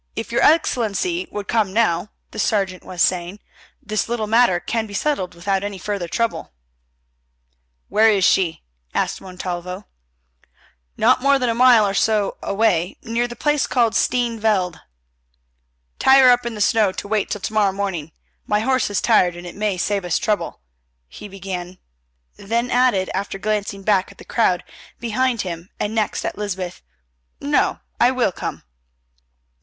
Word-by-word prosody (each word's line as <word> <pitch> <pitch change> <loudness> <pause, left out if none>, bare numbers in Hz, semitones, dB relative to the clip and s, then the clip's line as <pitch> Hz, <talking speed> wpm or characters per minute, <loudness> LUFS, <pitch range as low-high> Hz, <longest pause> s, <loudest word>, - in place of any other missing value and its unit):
"If 225 +1 -5
your 235 - +1
Excellency 325 - +2
would 205 -1 -6
come 210 -4 +1
now," 195 -4 +1 0.2
the 220 - -7
sergeant 195 -4 0
was 180 -2 -1
saying, 180 +1 0 0.5
"this 215 +2 -2
little 235 -2 -1
matter 220 -4 +3
can 225 +3 -2
be 200 - -8
settled 195 -10 -1
without 195 +3 -1
any 205 -1 -4
further 200 -2 -3
trouble." 230 - -2 1.3
"Where 220 +1 +4
is 200 -4 +3
she?" 175 -4 +2 0.3
asked - - -1
Montalvo. 180 0 -6 1.1
"Not 250 +3 +4
more 280 +1 +4
than 250 -2 0
a - - +2
mile 240 -2 +6
or 195 - -1
so 210 0 +1
away, 195 -4 +1
near 235 +2 -1
the 240 - -8
place 295 +3 +1
called 235 -3 +2
Steene 240 -2 +1
Veld." 190 -6 0 1.2
"Tie 265 0 +6
her 260 -2 +8
up 245 -1 +2
in 235 - -5
the 210 - -5
snow 210 -1 +3
to - - -6
wait 210 -1 0
till 210 - -4
to 220 - -4
morrow 210 -2 +3
morning. 190 -6 -4 0.4
My 210 0 +1
horse 260 +1 +1
is 205 - -1
tired 180 -6 +3
and 175 0 -9
it 175 - -7
may 205 -2 -1
save 200 +2 -1
us 175 -2 0
trouble," 210 - -2 0.5
he 210 - -10
began, 185 -2 -6 0.6
then 235 +4 -2
added, 245 -7 +2
after 195 +1 -3
glancing 205 -1 -2
back 195 -2 +2
at - - -18
the - - -13
crowd 185 -6 +1 0.4
behind 240 0 0
him 170 0 -6
and 210 - -2
next 215 -2 -1
at - - -4
Lysbeth, 190 -4 -4 0.6
"no, 290 +1 +1 0.2
I 240 - +5
will 255 -6 +1
come." - - -6
210 Hz, 165 wpm, -21 LUFS, 185-235 Hz, 1.3 s, her